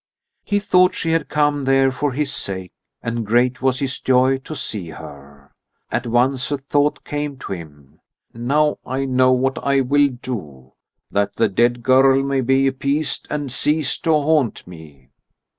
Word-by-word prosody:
He 205 - 0
thought 185 -3 +3
she 165 - -1
had 165 0 0
come 145 -2 +1
there 135 0 +3
for 145 +2 -2
his 140 +2 -2
sake, 95 -2 -4 0.3
and 115 0 -2
great 120 +4 +1
was 130 -1 +1
his 135 -1 -3
joy 130 +1 +2
to 155 +4 -8
see 100 - -5
her. 70 -2 -12 0.4
At 120 0 -2
once 125 +3 +1
a 145 - 0
thought 145 +2 0
came 145 -1 -4
to 130 - -9
him: 75 -6 -12 0.3
"Now 145 +6 +1
I 130 +2 -3
know 130 -1 +3
what 130 +1 0
I 140 -1 +2
will 145 +2 +3
do, 100 - -8 0.4
that 100 0 0
the 115 - +2
dead 120 +4 +1
girl 135 +1 +4
may 135 -1 0
be 135 +2 +2
appeased 140 +3 -1
and 145 -3 -3
cease 150 +2 0
to 165 - -3
haunt 150 -4 +1
me." 75 -7 -14
130 Hz, 165 wpm, -20 LUFS, 115-145 Hz, 0.4 s, girl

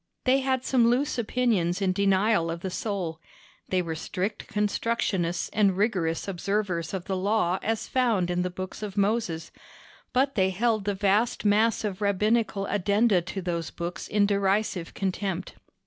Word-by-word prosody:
They 260 +1 +4
had 260 -1 0
some 240 -3 +4
loose 260 +2 +1
opinions 215 -7 +1
in 190 -2 +1
denial 195 -2 +2
of 170 0 -4
the 190 - -4
soul. 180 -6 -3 0.5
They 185 -1 +1
were 165 -1 -3
strict 185 +6 -4
constructionists 205 -4 0
and 200 -3 +3
rigorous 185 -6 0
observers 190 -3 -1
of 185 -2 -5
the 190 - -2
Law 190 -1 +1
as 225 -1 -2
found 225 -9 +1
in 175 0 0
the 180 - -1
books 185 +3 -7
of 205 -1 -6
Moses; 200 -5 0 0.6
but 270 +2 +2
they 190 -5 +2
held 215 +2 0
the 205 -1 0
vast 205 +4 +1
mass 215 +3 +3
of 205 -2 -3
Rabbinical 210 +1 +1
addenda 200 0 +2
to 185 +2 -6
those 170 -3 -2
books 175 +2 -5
in 210 -1 +3
derisive 200 -3 0
contempt. 190 -1 -2
200 Hz, 160 wpm, -27 LUFS, 180-220 Hz, 0.6 s, They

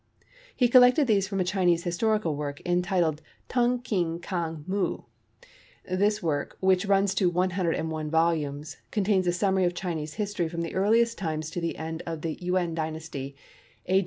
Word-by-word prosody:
He 250 - +4
collected 250 +3 +6
these 200 -5 +2
from 195 -1 -3
a - - +3
Chinese 180 -2 +1
historical 180 -1 0
work, 145 -1 -4
entitled 175 -3 +1 0.3
Tung 245 0 +1
Keen 175 -8 -1
Kang 170 -3 -4
Muh. 190 +1 -1 0.8
This 205 +3 +1
work, 145 -4 -2
which 190 +1 +2
runs 195 0 +3
to 185 -2 +2
101 170 -3 -1
volumes, 155 -2 0
contains 195 -3 +1
a - - +4
summary 190 +1 +1
of 175 0 0
Chinese 160 -5 -4
history 205 -5 -2
from 170 0 -4
the 165 - -4
earliest 230 +4 +2
times 155 -3 -3
to 175 - -4
the 170 - -2
end 160 +1 -5
of 165 -2 -5
the 165 -1 -1
Yuen 180 -1 0
Dynasty, 155 -4 -5 0.5
A. 190 +1 +3
175 Hz, 160 wpm, -27 LUFS, 160-195 Hz, 0.8 s, collected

